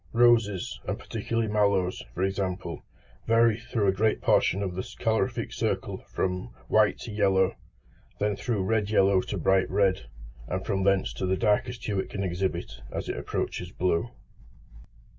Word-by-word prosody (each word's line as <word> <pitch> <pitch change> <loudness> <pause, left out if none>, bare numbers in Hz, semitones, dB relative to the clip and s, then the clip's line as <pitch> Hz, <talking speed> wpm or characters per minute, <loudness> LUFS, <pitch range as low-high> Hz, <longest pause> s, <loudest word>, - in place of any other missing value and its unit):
Roses, 115 - +3
and - - -1
particularly 115 -1 -2
mallows, 100 -3 +1
for 90 - -1
example, 95 -3 -2 0.5
vary 115 -1 +4
through 115 -2 -1
a 95 - +5
great 105 +3 +1
portion 100 +3 +2
of 95 -2 -3
the 95 - -3
colorific 110 -1 -1
circle - - -2
from 90 +3 -2 0.2
white 110 -1 +4
to 115 - -6
yellow, 95 -2 +2 0.6
then 105 0 +1
through 105 -1 -1
red 105 +1 +1
yellow 100 -3 +4
to 100 - -4
bright 95 +2 +2
red, 95 -8 +1 0.4
and 95 +1 -3
from 95 -3 0
thence 100 -1 +2
to 95 - -3
the 95 0 +1
darkest 120 +4 0
hue 100 -3 -1
it - - -3
can 100 - -3
exhibit 90 -7 -3
as - - -4
it - - -2
approaches 90 0 -3
blue. 90 +4 0
100 Hz, 160 wpm, -27 LUFS, 95-110 Hz, 0.6 s, a